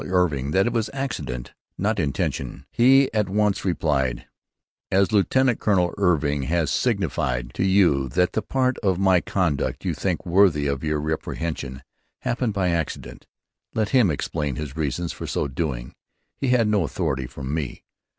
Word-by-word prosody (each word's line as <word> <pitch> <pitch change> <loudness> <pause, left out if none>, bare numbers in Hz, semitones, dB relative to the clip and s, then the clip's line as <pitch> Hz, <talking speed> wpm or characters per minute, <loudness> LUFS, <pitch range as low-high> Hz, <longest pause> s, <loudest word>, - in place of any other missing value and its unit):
Irving 85 -8 +1
that 95 +6 +3
it 120 - 0
was 115 -2 0
accident, 115 - -4
& - - -56
not 105 +2 0
Intention,' 70 -3 -2
he 135 +3 +5
at 105 -3 +1
once 105 0 +1
replied: 70 -9 0 0.7
'As 95 +2 +3
Lieutenant 120 +5 +3
Colonel 90 -5 +2
Irving 75 -7 +1
has 80 -1 0
signified 65 - -1
to - - -1
you 90 -9 +3
that 90 +8 +2
the 110 - 0
Part 130 +4 0
of 95 -4 +1
my 95 -2 +4
Conduct 85 -8 -1
you - - 0
think - - -2
worthy 85 -5 +4
of 70 0 -1
your 75 -1 0
Reprehension 75 -3 -4 0.4
happened 120 -2 -1
by 95 -2 +1
Accident 85 -2 -3 0.5
let 110 -2 +1
him 125 -8 +4
explain 75 -2 -2
his 75 -1 -6
reasons 80 +2 -2
for - - -7
so - - -1
doing. 65 -3 -3 0.4
He 135 - -2
had 125 -3 +3
no 105 -3 +2
authority 70 -7 -2
from 70 +1 -6
me.' 75 -6 -4
85 Hz, 160 wpm, -24 LUFS, 70-100 Hz, 0.7 s, he